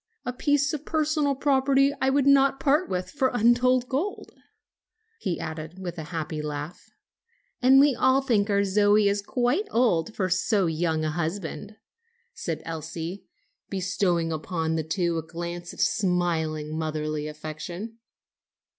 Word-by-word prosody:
"A 250 - -2
piece 290 +2 +1
of 300 -1 -4
personal 305 -3 0
property 275 0 +3
I 265 - +3
would 275 0 +2
not 275 -1 +4
part 300 +5 +2
with 180 -1 -3
for 275 -3 +1
untold 245 +2 +3
gold," 300 +11 -3 0.9
he 185 -5 -2
added 160 +2 -6
with 175 -2 -6
a 155 - -5
happy 160 -1 -4
laugh. 150 +2 -6 0.7
"And 265 +2 +7
we 285 0 +5
all 260 +2 +3
think 220 -6 +1
our 200 0 +3
Zoe 205 +1 +4
is 200 0 +1
quite 250 - 0
old 225 -4 +1
for 185 - 0
so 185 +2 +1
young 160 -1 0
a 155 - 0
husband," 170 +3 -4 0.6
said 165 -2 -4
Elsie, 165 +3 -6 0.4
bestowing 180 -3 0
upon 160 0 -2
the 160 - 0
two 170 +1 -1
a - - -3
glance 170 +2 -6
of - - -13
smiling, 160 -5 0
motherly 155 -1 -2
affection. 155 +9 -7
190 Hz, 145 wpm, -26 LUFS, 160-255 Hz, 0.9 s, And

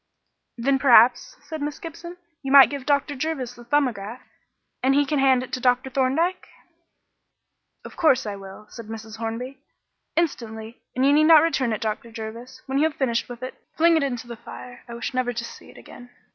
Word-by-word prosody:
"Then, 270 +3 +1
perhaps," 245 -2 +5
said 315 -2 -7
Miss 295 0 -3
Gibson, 340 +2 -9 0.2
"you 270 -2 -4
might 280 0 +8
give 280 -2 -6
Dr. 285 0 +1
Jervis 270 -4 -3
the 240 - -14
'Thumbograph' 240 -4 -1 0.6
and 270 +1 +3
he 290 0 +3
can 295 0 -1
hand 260 -2 +4
it 255 - -11
to - - -1
Dr. 250 +1 +1
Thorndyke." 295 +8 0 1.4
"Of - - -10
course 305 -9 +3
I 205 -1 -4
will," 195 +1 -11
said 230 -3 -10
Mrs. 220 0 -8
Hornby; 235 +4 -5 0.6
"instantly; 230 -8 -3
and 255 +1 +2
you 280 - +5
need 305 +1 +5
not 315 -1 +8
return 270 -7 0
it, 215 - -3
Dr. 220 +1 -4
Jervis. 230 +3 -9
When 270 +1 -1
you 305 - +4
have 315 -2 -1
finished 235 -4 -1
with 245 0 -9
it, 255 - -5 0.2
fling 335 +1 +5
it 320 - +2
into 250 -3 -3
the 240 0 -8
fire. 245 +1 -11
I 235 - -8
wish 235 - -5
never 250 -1 -1
to 235 0 -4
see - - -12
it - - -16
again." 245 0 -13
255 Hz, 200 wpm, -24 LUFS, 235-285 Hz, 1.4 s, might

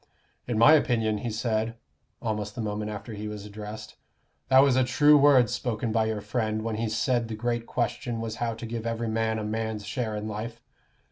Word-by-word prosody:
"In 120 -3 -1
my 115 +8 +8
opinion," 115 -8 +2
he 120 - -3
said, 110 0 -1 0.5
almost 105 -2 -3
the - - -7
moment 105 0 -3
after 105 +2 -6
he 105 0 -5
was 105 -1 -6
addressed, 105 +1 -8 0.5
"that 130 0 +7
was 140 -3 +4
a 130 - +4
true 145 +4 +5
word 140 -4 +6
spoken 120 -2 -2
by 110 0 +2
your 110 -1 -2
friend 110 0 -2
when 110 -1 -2
he 115 0 -1
said 120 +1 0
the 110 - -5
great 120 +1 -2
question 120 0 -2
was 115 -1 -4
how 115 -1 -1
to 115 - -7
give 115 0 -4
every 115 0 -2
man 110 0 0
a 110 - -3
man's 110 -1 -3
share 115 -3 -3
in 105 0 -4
life. 110 +2 -5
110 Hz, 205 wpm, -27 LUFS, 110-120 Hz, 0.5 s, my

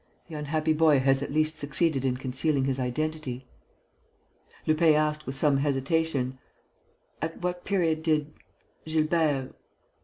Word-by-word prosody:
The - - -10
unhappy 155 +1 0
boy 155 -2 +5
has 135 +1 +3
at 140 - -4
least 155 +1 +1
succeeded 150 -1 0
in 130 -2 0
concealing 135 +2 0
his 135 -1 -1
identity." 130 0 -3 1.2
Lupin 155 0 +4
asked, 150 0 0
with 135 - -3
some 140 0 +3
hesitation: 140 -1 0 0.8
"At 165 +2 -3
what 180 0 -2
period 165 -5 +1
did... 155 -2 0 0.5
Gilbert 155 -4 +1
150 Hz, 125 wpm, -27 LUFS, 135-160 Hz, 1.2 s, boy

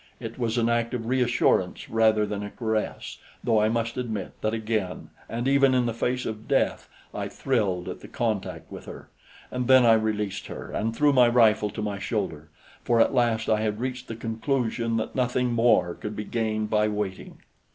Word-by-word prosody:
It 115 0 -7
was 115 0 -1
an 115 -1 +2
act 115 +1 0
of 115 -2 -4
reassurance 125 +1 +1
rather 110 -1 +3
than 105 -1 -4
a 105 - -5
caress, 110 -1 -3 0.2
though 110 -2 +3
I 110 - +3
must 115 +1 -1
admit 110 -6 -3
that 110 - 0
again 110 -5 -3 0.2
and 120 +3 -2
even 135 -1 +4
in 125 -1 +2
the 115 - -1
face 125 +2 -1
of 110 0 -5
death - - 0 0.2
I - - -3
thrilled 100 -9 -1
at - - -5
the - - -11
contact 110 -5 -3
with - - -9
her; - - -10 0.4
and 125 -1 -2
then 130 -2 +7
I 115 - +7
released 105 -3 -1
her - - -8
and 115 +2 -2
threw 145 +3 +4
my 125 -2 +6
rifle 110 -3 +4
to 110 - -5
my 100 -1 -3
shoulder, 80 -4 -3 0.3
for 120 -1 +2
at 115 - +4
last 120 -3 +1
I 110 -1 +2
had 105 -1 -1
reached 125 0 -4
the 115 - -5
conclusion 115 0 -1
that 110 - -3
nothing 125 -1 0
more 115 -7 +3
could 105 +3 -6
be 105 - -4
gained 110 -2 -2
by 105 0 +3
waiting. 105 -3 -4
115 Hz, 195 wpm, -26 LUFS, 105-120 Hz, 0.4 s, then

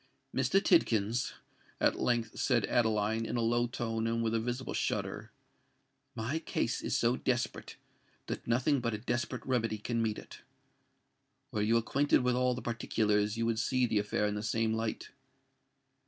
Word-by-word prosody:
"Mr. 195 - +3
Tidkins," 120 - +2 0.5
at - - +2
length 120 -2 0
said 120 -5 +2
Adeline, 110 -1 +1
in 115 +2 -2
a - - +1
low 120 +1 +2
tone 115 -1 -2
and 115 0 0
with 115 0 0
a 115 - +2
visible 120 +3 -3
shudder, - - -2 0.8
"my 120 +8 -2
case 120 -7 -1
is - - 0
so 120 +1 +2
desperate 120 -2 -2 0.5
that - - -5
nothing 130 +5 +2
but 115 -2 -1
a - - -3
desperate 120 +2 -3
remedy 115 -4 0
can 115 +2 -2
meet 110 -2 0
it. - - -11 1.1
Were 105 - -1
you 110 +3 +3
acquainted 135 +4 +2
with 125 0 +2
all 125 0 +2
the 125 - -6
particulars, 105 -2 0
you 115 - 0
would 115 -1 0
see 130 +2 +2
the 110 -3 +1
affair 105 0 0
in 105 - 0
the 105 - -3
same 110 +1 0
light. 110 0 -3
115 Hz, 170 wpm, -32 LUFS, 110-120 Hz, 1.1 s, Mr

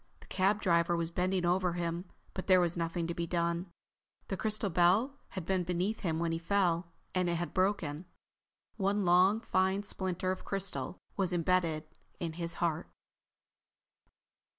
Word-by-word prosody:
The - - -15
cab 200 +2 +1
driver 170 -1 +3
was 165 0 -2
bending 180 +1 0
over 180 0 +2
him, 170 +1 -2 0.3
but 190 - -5
there 185 -1 +7
was 175 -1 +2
nothing 170 0 -1
to 170 - -2
be 170 0 -3
done. 170 +1 0 0.6
The 195 - 0
crystal 210 +2 -1
bell 200 - +3
had 185 -4 -6
been 190 0 +1
beneath 180 +5 -1
him 165 -4 -1
when 165 0 0
he 165 - -1
fell, 175 -1 +1 0.3
and 185 -1 +1
it 170 - +1
had 170 +1 -3
broken. 185 -4 0 0.7
One 200 0 +1
long, 185 +5 +5
fine 190 -1 +1
splinter 185 -2 -2
of 185 - -4
crystal 195 -1 -3 0.2
was 190 -3 +1
embedded 170 -2 +1 0.4
in 165 -2 -3
his 170 0 -3
heart. 170 -1 -1
180 Hz, 160 wpm, -32 LUFS, 170-190 Hz, 0.7 s, there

